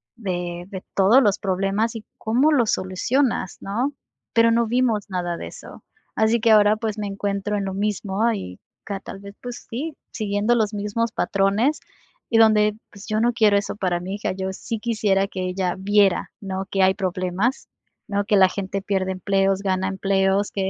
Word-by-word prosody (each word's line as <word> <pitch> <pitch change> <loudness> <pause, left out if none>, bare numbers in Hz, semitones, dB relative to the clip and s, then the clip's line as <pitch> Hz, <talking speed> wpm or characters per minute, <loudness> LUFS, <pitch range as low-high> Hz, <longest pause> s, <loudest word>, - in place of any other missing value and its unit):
de 175 -5 -4
de 190 -2 -7
todos 205 +7 +6
los 205 -2 +2
problemas 195 +4 0
y 220 - -7
cómo 250 +8 +2
lo 260 -6 +3
solucionas, 185 +4 0
¿no? 245 +9 -2 0.4
Pero 230 0 +5
no 230 0 +2
vimos 230 -4 +1
nada 175 -2 -2
de - - -6
eso. - - -12 0.3
Así 220 +2 +3
que 225 - +4
ahora, 210 0 +6
pues, 220 -1 -3
me 205 - -2
encuentro 200 +1 -2
en 200 - -2
lo 190 - -3
mismo 210 +2 0
y, 90 - -6 0.3
ca 200 -2 -4
tal - - -8
vez, 200 0 -11
pues, 245 -1 -8
sí, 290 +6 -4 0.2
siguiendo 210 +1 0
los 215 -2 +1
mismos 210 +3 -1
patrones 200 +11 +1 0.5
y 230 - +3
donde, 215 -1 +5 0.2
pues, 200 0 -12
yo 215 0 0
no 240 +1 +2
quiero 215 -3 +4
eso 200 0 -2
para 180 -4 -1
mi 190 +3 -5
hija, 205 - -2
yo 190 0 -3
sí 225 +4 -5
quisiera 210 -4 +1
que 190 -2 -6
ella 180 -1 -1
viera, 200 0 +2
¿no? 195 -1 -4
Que 195 -1 +2
hay 190 0 +5
problemas, 185 +5 -1 0.4
¿no? 200 -1 -1
Que 205 0 +3
la 190 - +7
gente 195 0 -4
pierde 190 -2 -1
empleos, 195 +1 +1
gana 190 -1 0
empleos, 195 +1 +1
que, 190 -1 -1
200 Hz, 185 wpm, -23 LUFS, 190-220 Hz, 0.5 s, la